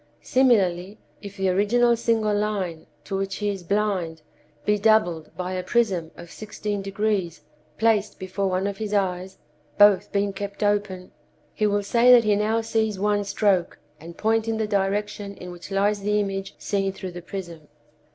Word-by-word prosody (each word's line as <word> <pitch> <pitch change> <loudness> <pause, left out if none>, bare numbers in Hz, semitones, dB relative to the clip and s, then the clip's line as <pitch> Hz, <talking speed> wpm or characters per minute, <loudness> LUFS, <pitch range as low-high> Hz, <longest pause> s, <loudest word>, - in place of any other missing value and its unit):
Similarly, 200 -7 +2 0.2
if 200 0 -9
the 190 -1 +1
original 235 +6 +3
single 225 -2 +1
line, 200 -6 -2 0.2
to 195 - -4
which 195 0 -2
he 210 -1 -2
is 195 -2 -4
blind, 180 -4 -1 0.4
be 210 0 +2
doubled 200 -7 +2
by 180 0 -3
a 185 - -2
prism 185 -5 0
of 175 -1 -11
sixteen 210 -1 -5
degrees 195 -3 -2 0.4
placed 215 -2 +1
before 190 +1 -2
one 185 +1 0
of 200 -1 -3
his 210 -1 -3
eyes 185 -1 -1 0.4
(both 205 -2 +5
being 200 0 0
kept 200 +1 -5
open), 205 -3 -1 0.4
he 215 - +1
will 205 0 0
say 235 +4 +4
that 245 -2 +8
he 210 -1 +3
now 215 +2 +1
sees 220 -2 -1
one 205 0 +1
stroke, 200 -2 +1 0.2
and 170 +2 -11
point 225 +1 +1
in 225 -1 -1
the 220 - 0
direction 200 0 -2
in 180 - -8
which 175 +1 -10
lies 200 +1 +1
the 210 +1 +1
image 195 -1 -3
seen 195 -1 -1
through 190 -1 -7
the 175 0 -8
prism. 170 -4 -8
200 Hz, 170 wpm, -24 LUFS, 185-210 Hz, 0.4 s, that